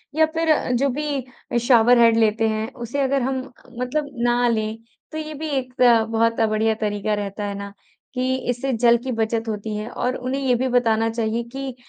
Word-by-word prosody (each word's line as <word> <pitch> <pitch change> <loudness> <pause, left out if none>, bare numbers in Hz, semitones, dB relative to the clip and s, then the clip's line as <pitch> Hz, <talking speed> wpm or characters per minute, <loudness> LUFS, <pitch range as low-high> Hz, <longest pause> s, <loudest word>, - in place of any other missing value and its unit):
या 315 - +5
फ़िर 320 -5 +1
जो 275 +3 +2
भी 260 -3 -3
शॉवर 245 -1 +6
हेड 230 -1 +5
लेते 220 0 +2
हैं 220 +1 -2
उसे 245 +3 -4
अगर 275 0 +1
हम 265 +1 -1 0.4
मतलब 285 +4 -1 0.2
ना 240 0 +2
लें 220 -1 -1 0.3
तो 315 - -5
ये 310 0 -5
भी 310 +2 -5
एक 255 -3 -3
अ, 235 -2 +6
बहुत 230 0 +1
बढ़िया 220 +1 +1
तरीक़ा 210 -1 -2
रहता 205 0 -3
है 200 - -3
ना 200 0 -7 0.4
कि 255 0 0
इससे 245 +2 -1
जल 235 +1 +4
की 260 - -3
बचत 225 0 -1
होती 215 0 -4
है। 210 +2 -4
और 250 +1 -2
उन्हें 255 +2 -3
ये 260 -2 +2
भी 260 +2 0
बताना 225 -2 +2
चाहिए 225 0 -1
कि 270 0 -6
240 Hz, 195 wpm, -22 LUFS, 220-260 Hz, 0.4 s, शॉवर